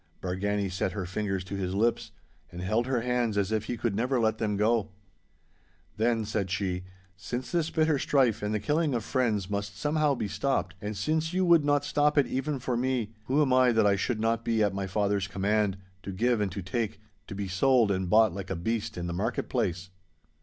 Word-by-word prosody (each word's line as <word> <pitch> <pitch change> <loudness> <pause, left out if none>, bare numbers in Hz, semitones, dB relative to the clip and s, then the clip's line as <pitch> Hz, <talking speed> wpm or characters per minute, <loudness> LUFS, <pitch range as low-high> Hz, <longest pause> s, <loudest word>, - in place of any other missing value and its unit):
Bargany 100 +2 -1
set 90 0 -2
her 100 -3 -3
fingers 95 0 -2
to 95 +2 -6
his 95 -1 -2
lips, 115 +2 +1 0.4
and 85 - -8
held 110 +7 0
her 130 -3 0
hands 120 -3 0
as 100 0 +1
if 110 -1 0
he 120 - -3
could 115 -3 -1
never 125 +4 +1
let 110 -1 +1
them 105 -2 0
go. 110 0 +2 1.1
'Then,' 115 0 +1
said 100 -2 -2
she, 90 -1 -2 0.3
'since 120 +8 -5
this 165 -2 +1
bitter 155 -3 +2
strife 130 -6 +2
and 105 0 -2
the 105 - 0
killing 150 +5 +1
of 115 - -1
friends 110 -7 0
must 100 0 -4
somehow 150 +3 +1
be 110 - -3
stopped, 100 -3 -1
and 105 0 -4
since 160 - 0
you 185 0 +2
would 170 -3 +5
not 145 0 +2
stop 150 +1 +2
it 145 - +5
even 135 +4 -2
for 125 -1 -2
me—who 120 +2 0
am 130 -3 +1
I 130 -1 +5
that 110 -1 +3
I 100 -1 +4
should 110 +3 -1
not 115 +1 0
be 115 -2 +1
at 100 -2 +1
my 95 0 -3
father's 100 0 0
command, 100 0 0 0.2
to 100 - -6
give 115 +4 +1
and 100 -2 0
to 95 +1 -5
take, 105 +2 -2 0.3
to - - -7
be 100 0 -3
sold 115 +3 +3
and 95 -2 -1
bought 110 -1 +5
like 95 0 -6
a 95 - -2
beast 110 +5 -2
in 85 - -3
the 85 - -3
market 90 - -2
place? 90 +2 -2
110 Hz, 215 wpm, -28 LUFS, 100-125 Hz, 1.1 s, would